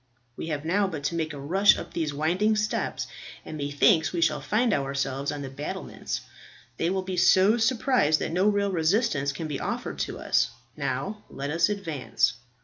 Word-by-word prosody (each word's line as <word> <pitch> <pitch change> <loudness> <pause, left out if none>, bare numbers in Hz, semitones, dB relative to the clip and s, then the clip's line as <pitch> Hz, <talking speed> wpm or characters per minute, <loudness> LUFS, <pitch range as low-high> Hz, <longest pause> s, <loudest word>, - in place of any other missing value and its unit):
We - - -6
have 150 -2 -3
now 195 +4 +2
but 160 -6 -5
to 145 - -1
make 160 -1 -1
a 145 - -7
rush 190 +9 +4
up - - -8
these 160 -3 -1
winding 175 +9 +1
steps, 215 0 -1 0.4
and - - -7
methinks 145 +4 +3
we 175 - -2
shall 155 -3 +2
find 215 - +1
ourselves 140 -1 -1
on 145 -1 -5
the 135 - -5
battlements. 145 +2 -5 0.6
They 165 - +1
will 190 0 -1
be 185 -1 -4
so 190 +5 +5
surprised, 230 - +2
that - - -2
no 185 +4 +2
real 200 -1 +2
resistance 165 - +1
can 155 +3 -5
be 145 -3 -3
offered - - -4
to - - -2
us. - - +2 0.3
Now 200 +12 -3
let 140 +1 -4
us 165 +6 +3
advance." 165 -12 0
165 Hz, 185 wpm, -26 LUFS, 145-200 Hz, 0.6 s, so